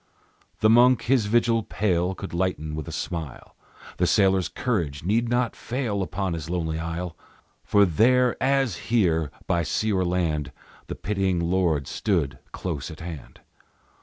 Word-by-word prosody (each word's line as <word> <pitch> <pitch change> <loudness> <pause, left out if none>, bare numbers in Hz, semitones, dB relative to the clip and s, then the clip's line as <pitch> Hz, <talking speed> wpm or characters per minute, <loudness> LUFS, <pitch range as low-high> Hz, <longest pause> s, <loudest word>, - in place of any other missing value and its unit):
The 110 - +5
monk 125 +1 +5
his 120 -4 +2
vigil 115 +1 +3
pale 95 -3 0
Could 95 - -7
lighten 85 -4 -1
with 75 -2 -5
a - - -5
smile, 80 -7 -6 0.4
The - - +2
sailor's 95 -2 +3
courage 85 - -2
need 115 +6 +1
not 120 0 0
fail 120 -5 -2
Upon 95 -1 -2
his 80 -1 -5
lonely 80 -3 -2
isle; 85 +1 -4 0.5
For 100 -1 +4
there, 125 +8 +3
as 135 -7 +2
here, 85 -10 +2 0.2
by 85 - +1
sea 105 +6 0
or 95 -1 +2
land, 80 -5 -1 0.4
the - - -5
pitying 95 -3 -1
Lord 85 -4 +1
stood 75 - -1
close 80 -6 -4
at 80 +1 -10
hand. 80 -5 -9
95 Hz, 150 wpm, -25 LUFS, 80-110 Hz, 0.5 s, The